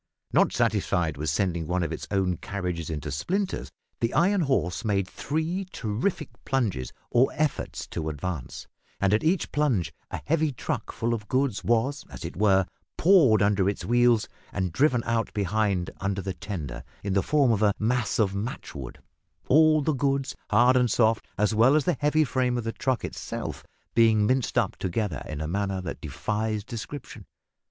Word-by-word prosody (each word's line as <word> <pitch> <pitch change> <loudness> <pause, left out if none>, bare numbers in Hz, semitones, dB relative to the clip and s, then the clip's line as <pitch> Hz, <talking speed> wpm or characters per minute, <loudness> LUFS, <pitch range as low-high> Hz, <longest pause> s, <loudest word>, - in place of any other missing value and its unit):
Not - - +4
satisfied 80 -4 +1
with 75 +2 -2
sending 85 +1 0
one 90 +1 0
of - - -2
its - - -5
own 95 -3 +1
carriages 90 -5 -4
into 75 -2 -4
splinters, 190 - -2 0.3
the 115 0 -1
iron 190 +4 +3
horse 130 - 0
made 100 -4 +1
three 160 - -2
terrific 125 - -2
plunges 105 - -1 0.2
or 125 +2 +4
efforts 155 -2 -2
to 80 -1 -3
advance, 75 -1 -5 0.3
and 100 0 +2
at 105 - +2
each 165 +3 +1
plunge 130 - +1 0.2
a - - -4
heavy 155 -1 +2
truck 125 - -4
full 115 +1 -1
of 105 -2 -4
goods 130 -3 0
was, 120 +5 +1
as - - -8
it 85 - -6
were, 95 -1 +4 0.3
pawed 150 - +5
under 100 -1 +3
its 100 - -4
wheels 120 -1 +3 0.2
and 95 -4 -2
driven 130 - +3
out 115 -1 0
behind, 100 -2 0
under 100 -1 -2
the 95 - -3
tender, 90 - -6 0.2
in 100 -2 -1
the 100 - +3
form 140 -1 +3
of 110 -2 +1
a 105 -2 +3
mass 115 +1 0
of 100 -4 +2
matchwood 105 +6 -5 0.5
all 155 +1 +5
the 155 - +1
goods, 135 0 0
hard 125 +2 +5
and 125 -1 +3
soft, 110 0 +2
as 105 +2 +2
well 120 +6 +5
as 155 - +3
the 180 - +2
heavy 150 +2 +3
frame 125 -3 0
of 120 - -2
the 115 - -2
truck 130 -4 -1
itself - - -5 0.3
being 110 -2 +4
minced 130 +2 +1
up - - +2
together 95 0 -2
in 75 -1 -4
a 80 - -2
manner 100 +2 -1
that 90 - -6
defies 105 +9 -2
description. 115 0 -7
110 Hz, 175 wpm, -26 LUFS, 95-135 Hz, 0.5 s, pawed